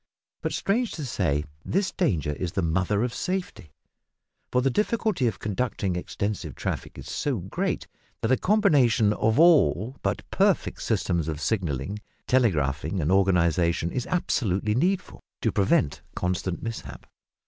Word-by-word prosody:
But, -, -, -2 dB
strange 230 Hz, +4 st, 0 dB
to 150 Hz, -, -5 dB
say, 80 Hz, -, 0 dB, 0.2 s
this 190 Hz, +1 st, 0 dB
danger 85 Hz, -, 0 dB
is 85 Hz, +4 st, -4 dB
the 95 Hz, -, 0 dB
mother 95 Hz, +6 st, +1 dB
of 125 Hz, -1 st, -2 dB
safety, 180 Hz, -, -4 dB, 0.8 s
for 125 Hz, 0 st, +2 dB
the 135 Hz, -, +2 dB
difficulty 210 Hz, -, +1 dB
of 110 Hz, -, -2 dB
conducting 100 Hz, -3 st, -2 dB
extensive 90 Hz, -, -3 dB
traffic -, -, -4 dB
is -, -, -9 dB
so 140 Hz, -4 st, -1 dB
great, 95 Hz, 0 st, -2 dB, 0.4 s
that -, -, 0 dB
a 130 Hz, -, +5 dB
combination 140 Hz, -, +3 dB
of 110 Hz, +5 st, +1 dB
all 140 Hz, -, +4 dB
but -, -, -2 dB
perfect -, -, +1 dB
systems 85 Hz, -3 st, 0 dB
of 75 Hz, -2 st, -3 dB
signalling, 95 Hz, -, -2 dB, 0.3 s
telegraphing, 80 Hz, -, +1 dB
and 80 Hz, +1 st, 0 dB
organisation 85 Hz, -3 st, +2 dB
is 125 Hz, -, -3 dB
absolutely 105 Hz, -, 0 dB
needful 180 Hz, -, 0 dB, 0.2 s
to -, -, +1 dB
prevent 95 Hz, -7 st, +2 dB
constant 90 Hz, 0 st, -2 dB
mishap. 70 Hz, -, -6 dB
105 Hz, 140 wpm, -26 LUFS, 85-130 Hz, 0.8 s, a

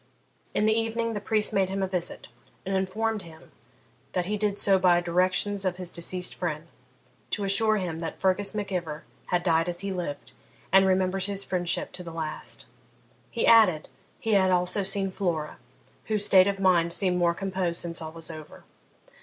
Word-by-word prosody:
In 210 Hz, -, +2 dB
the 220 Hz, -, +4 dB
evening 225 Hz, +1 st, -1 dB
the 205 Hz, -, -4 dB
priest 215 Hz, 0 st, +1 dB
made 190 Hz, -1 st, +2 dB
him 195 Hz, 0 st, -2 dB
a -, -, 0 dB
visit, 180 Hz, -2 st, -4 dB, 0.4 s
and 195 Hz, +1 st, -1 dB
informed 210 Hz, +3 st, -1 dB
him 160 Hz, -2 st, -14 dB, 0.6 s
that 180 Hz, -1 st, 0 dB
he 210 Hz, +3 st, -1 dB
did 205 Hz, -1 st, -1 dB
so 195 Hz, -2 st, +4 dB
by 175 Hz, -1 st, +4 dB
directions 185 Hz, +3 st, 0 dB
of 185 Hz, -2 st, -1 dB
his 180 Hz, -2 st, -6 dB
deceased 180 Hz, +1 st, 0 dB
friend, 155 Hz, -3 st, -4 dB, 0.6 s
to 205 Hz, -, -2 dB
assure 215 Hz, +2 st, +2 dB
him 175 Hz, -5 st, -3 dB
that 165 Hz, -1 st, -5 dB
Fergus 195 Hz, +2 st, 0 dB
Mac 205 Hz, -1 st, -3 dB
Ivor 160 Hz, -5 st, -4 dB, 0.2 s
had 175 Hz, -1 st, 0 dB
died 165 Hz, -1 st, +2 dB
as 175 Hz, 0 st, -4 dB
he 195 Hz, -1 st, -3 dB
lived, 170 Hz, -6 st, -5 dB, 0.4 s
and 195 Hz, 0 st, +6 dB
remembered 190 Hz, 0 st, +1 dB
his 200 Hz, -1 st, -3 dB
friendship 175 Hz, -2 st, -1 dB
to -, -, -5 dB
the 170 Hz, -, -7 dB
last. 160 Hz, -2 st, -6 dB, 0.6 s
He 235 Hz, -, -1 dB
added, 210 Hz, -9 st, +5 dB, 0.3 s
he 225 Hz, -, -1 dB
had 190 Hz, -2 st, +4 dB
also 180 Hz, +2 st, +2 dB
seen 195 Hz, 0 st, 0 dB
Flora, 170 Hz, -6 st, -2 dB, 0.5 s
whose 210 Hz, -2 st, +1 dB
state 185 Hz, 0 st, +6 dB
of 200 Hz, -1 st, -1 dB
mind 175 Hz, -3 st, +3 dB
seemed 180 Hz, -1 st, +2 dB
more 170 Hz, -1 st, +2 dB
composed 185 Hz, -2 st, -2 dB
since 170 Hz, 0 st, -3 dB
all 160 Hz, -1 st, -6 dB
was 165 Hz, 0 st, -9 dB
over. 155 Hz, -1 st, -11 dB
185 Hz, 185 wpm, -27 LUFS, 175-200 Hz, 0.6 s, and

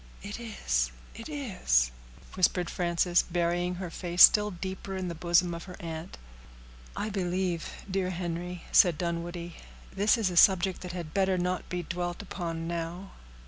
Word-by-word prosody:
"It 205 Hz, +3 st, -6 dB
is—it 60 Hz, -, -3 dB
is," 185 Hz, -, +1 dB, 0.4 s
whispered 180 Hz, -1 st, +1 dB
Frances, 175 Hz, 0 st, +2 dB
burying 175 Hz, +1 st, -1 dB
her 180 Hz, -1 st, -6 dB
face 175 Hz, +1 st, +4 dB
still 210 Hz, 0 st, +8 dB
deeper 190 Hz, +1 st, -6 dB
in 185 Hz, -1 st, -3 dB
the -, -, -3 dB
bosom 175 Hz, +1 st, +2 dB
of 170 Hz, -, -7 dB
her 180 Hz, -2 st, -9 dB
aunt. 165 Hz, 0 st, -7 dB, 0.8 s
"I 215 Hz, -, -2 dB
believe, 180 Hz, -2 st, -1 dB, 0.2 s
dear 190 Hz, -1 st, -1 dB
Henry," 175 Hz, 0 st, -4 dB
said 175 Hz, -5 st, +6 dB
Dunwoodie, 170 Hz, 0 st, -4 dB, 0.4 s
"this 205 Hz, +5 st, +3 dB
is 210 Hz, -5 st, 0 dB
a 175 Hz, -, -4 dB
subject 190 Hz, 0 st, +5 dB
that 180 Hz, -1 st, -6 dB
had 170 Hz, -4 st, -6 dB
better 190 Hz, -1 st, +2 dB
not 180 Hz, 0 st, -2 dB
be 180 Hz, -1 st, -3 dB
dwelt 175 Hz, +2 st, -4 dB
upon 165 Hz, -4 st, -4 dB
now." 170 Hz, +3 st, -4 dB
175 Hz, 150 wpm, -29 LUFS, 170-190 Hz, 0.8 s, still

